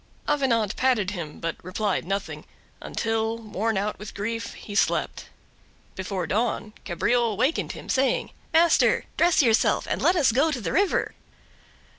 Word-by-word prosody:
Avenant 235 -8 +1
patted 240 -7 +1
him, 165 -6 -6
but 165 0 -3
replied 190 +3 -1
nothing; 195 +2 -4 0.4
until, 225 0 -1
worn 220 -1 -2
out 205 +2 -2
with 210 +1 -9
grief, 230 +3 -4
he 205 - -9
slept. 200 - 0 0.7
Before 190 -1 -3
dawn 220 +2 -1
Cabriole 230 +4 +1
wakened 260 +8 0
him, - - -10
saying: 265 0 +1 0.2
"Master, 335 +1 +4
dress 340 -3 +4
yourself 225 -3 +3
and - - -2
let 360 - +4
us 285 -8 +4
go 275 +8 +3
to 285 -5 -2
the 215 - -3
river." 395 0 +1
225 Hz, 145 wpm, -25 LUFS, 200-260 Hz, 0.7 s, Master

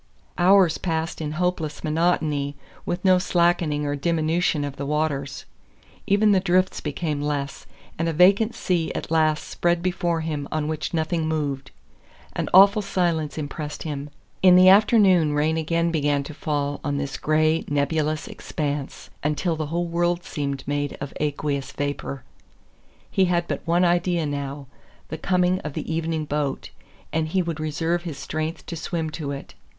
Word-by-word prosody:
Hours 180 -2 +5
passed 165 -1 -2
in 150 -1 -3
hopeless 160 -3 -2
monotony, 155 -3 0 0.3
with 175 +2 -3
no 185 -1 +6
slackening 170 -4 +1
or 145 0 -1
diminution 160 +1 +1
of 140 -1 -4
the 140 - -4
waters. 145 -2 -2 0.6
Even 205 +1 +4
the 195 - +5
drifts 185 0 +1
became 150 0 -3
less, 145 -1 -3 0.3
and 165 0 +1
a - - +1
vacant 195 +7 +4
sea 170 -3 0
at - - -5
last 155 -2 +2
spread 175 0 0
before 175 -2 0
him 150 -3 -3
on 155 -1 -1
which 155 -2 -3
nothing 160 0 -1
moved. 145 -4 -2 0.6
An - - -2
awful 200 +3 +7
silence 170 -6 -1
impressed 150 0 -5
him. 145 -2 -5 0.3
In 185 -1 +7
the 185 +1 +8
afternoon 190 -6 +5
rain 150 +2 +1
again 165 +1 0
began 145 -3 +1
to 150 - -8
fall 145 -3 -2
on 145 -1 -1
this 140 -1 -3
gray, 155 +1 +2
nebulous 150 +1 0
expanse, 145 -2 -5
until 150 +3 0
the 155 -1 -3
whole 170 +3 -1
world 175 +1 0
seemed 140 -3 -4
made 145 0 -2
of 140 0 -6
aqueous 145 -2 -2
vapor. 145 -1 -4 0.9
He 190 - +3
had 175 -1 0
but - - -3
one 175 +2 +3
idea 175 -1 +1
now 140 -1 -4 0.4
the 160 - -5
coming 180 +1 +2
of 150 -5 -6
the 160 - -4
evening 160 -1 -1
boat, 145 -2 -2 0.4
and 160 0 0
he 185 +3 +1
would 165 -2 -4
reserve 160 +3 -1
his 165 -5 -6
strength 155 +3 -4
to 170 - -6
swim 160 0 -3
to 150 -3 -5
it. 140 -1 -6
160 Hz, 160 wpm, -24 LUFS, 145-175 Hz, 0.9 s, the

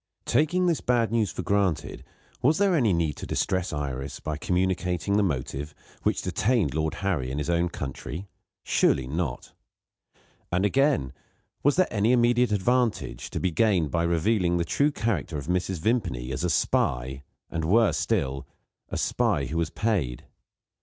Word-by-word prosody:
Taking 175 +5 +2
this 170 -3 +1
bad 120 -2 +1
news 115 -4 +1
for - - -5
granted, 100 -5 0 0.4
was 150 +5 +3
there 195 -3 +3
any 120 -9 +3
need 85 -4 0
to - - -7
distress 95 0 -1
Iris 70 -2 -4
by 75 - -3
communicating 90 +3 0
the 105 - +4
motive 75 -3 -2 0.3
which - - 0
detained 100 - +1
Lord 80 +1 -1
Harry 80 -10 0
in 65 - -4
his 75 +3 -1
own 85 +1 +1
country? 75 +5 -6 0.4
Surely 65 - +2
not! 70 -1 -4 1.0
And, 90 +3 +2
again, 135 - +2 0.5
was 145 - +3
there 185 0 +3
any 110 +3 +3
immediate 120 -1 +3
advantage 110 - 0
to - - -3
be 95 - 0
gained 85 -3 +2
by 85 - +1
revealing 85 +2 +1
the 85 - 0
true 140 - +2
character 110 - -2
of 70 - -5
Mrs. 90 +1 -1
Vimpany, 85 - -1
as 65 +5 -3
a 90 - +1
spy, 65 -3 0 0.3
and, 80 -1 -2
worse 105 +7 +3
still, 70 -11 -1 0.4
a - - -3
spy - - +1
who 80 - -4
was 85 -1 0
paid? 85 - -1
90 Hz, 160 wpm, -26 LUFS, 75-115 Hz, 1.0 s, the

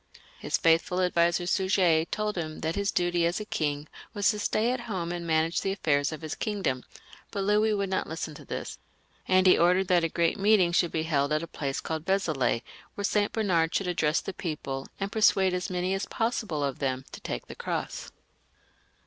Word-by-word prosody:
His - - 0
faithful 165 +2 +2
adviser 175 -1 +2
Suger 180 -3 +3
told 210 +3 -2
him 155 -3 -4
that 160 +1 -1
his 200 +1 -1
duty 175 -1 +1
as 175 +4 -1
a 210 - -5
king 150 -5 -2 0.3
was 205 0 +3
to 210 - -5
stay 220 +3 +1
at 255 - -1
home 175 -4 -2
and 175 -1 -4
manage 160 +1 +1
the 195 - -1
affairs 145 -6 +1
of 155 0 -7
his 155 - -4
kingdom, 195 - -2 0.5
but 200 -2 -3
Louis 210 +2 +3
would 200 -1 -2
not 190 - 0
listen 160 -1 -5
to - - -11
this; - - -6 0.5
and 185 0 +4
he 185 - +6
ordered 180 +2 +3
that 175 -2 +4
a 165 - +1
great 170 +4 0
meeting 200 -3 +4
should 175 0 +2
be 160 - -1
held 145 -3 0
at 155 +1 +1
a - - -5
place 140 -3 -3
called 160 +1 -4
Vezelay, 155 -12 +1 0.3
where 205 - -2
St. 205 0 +1
Bernard 175 -7 +1
should 195 - +1
address 160 -3 +1
the 195 - -6
people, 140 -6 -4
and 195 0 -2
persuade 195 -4 +4
as 180 0 -2
many 180 +1 -1
as 195 +1 -2
pos 230 +2 -1
sible 155 -8 -1
of 135 - -6
them 130 -1 -2
to - - -9
take - - -4
the - - -9
cross. - - -4
175 Hz, 210 wpm, -28 LUFS, 160-195 Hz, 0.5 s, he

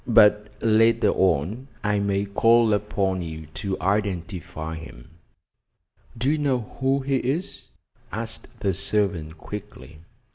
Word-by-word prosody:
"But 105 -2 +6
later 115 +1 +4
on 95 - +1 0.2
I 105 0 +1
may 100 0 0
call 115 +2 +4
upon 100 -2 0
you 80 -2 -6
to 95 -2 -3
identify 90 -5 -2
him." 65 -5 -10 1.1
"Do 125 +5 +1
you 155 - +1
know 135 -4 +1 0.2
who 135 +1 +2
he 135 0 +1
is?" 155 +11 -3 0.4
asked 110 0 -5
the 100 -2 +1
servant 95 -5 -1
quickly. 105 -4 -9
105 Hz, 120 wpm, -24 LUFS, 90-115 Hz, 1.1 s, But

